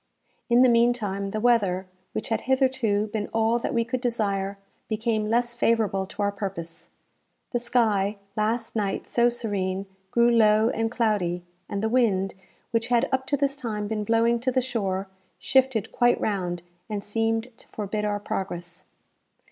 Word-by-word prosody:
In 240 +1 +6
the - - +7
meantime, 230 -5 +2
the 215 - -2
weather, 205 -6 +2 0.3
which - - -4
had 225 - 0
hitherto 260 -6 +2
been 210 -2 -1
all 225 +1 +1
that - - -2
we 230 -1 +1
could 250 +1 -2
desire, 200 -5 -1 0.3
became 220 -1 -1
less 240 +1 +1
favourable 215 -5 +1
to 205 - -4
our 200 - +2
purpose. 190 -5 -6 0.6
The 240 - 0
sky, 220 -4 +1 0.2
last 225 +2 -1
night 200 -3 -1
so 240 0 +3
serene, 200 -5 -2 0.2
grew 235 +3 +4
low 220 -1 +5
and 225 0 0
cloudy, 205 -7 0 0.3
and 200 +1 -3
the - - +2
wind, 215 -6 +2 0.4
which 230 0 0
had 240 -1 +3
up 265 0 0
to 285 - +1
this 280 0 +1
time 215 -6 -3
been 215 0 -2
blowing 230 +2 +2
to 255 +2 0
the 255 - +2
shore, 200 -7 -2 0.3
shifted 260 -5 +2
quite 240 0 +3
round, 180 -4 -2 0.3
and 205 -2 -3
seemed 225 +3 -1
to - - -15
forbid 210 0 -3
our 205 -1 0
progress. 175 -3 -5
220 Hz, 165 wpm, -26 LUFS, 200-235 Hz, 0.6 s, the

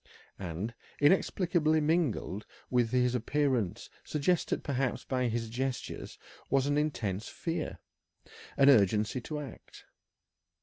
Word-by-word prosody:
And, 95 +5 -4 0.3
inexplicably 160 0 +3
mingled 150 - 0 0.2
with 120 -2 +3
his 125 0 +2
appearance, 125 -4 0 0.2
suggested 155 +4 0
perhaps 135 -3 -1
by 125 -2 0
his 115 0 -1
gestures, 125 +3 -4 0.3
was 135 0 +3
an 145 0 +1
intense 115 -10 -1
fear, 165 -2 -3 0.8
an 140 - +6
urgency 105 +1 +3
to 150 +4 -4
act. 145 -3 -10
130 Hz, 105 wpm, -31 LUFS, 115-150 Hz, 0.8 s, an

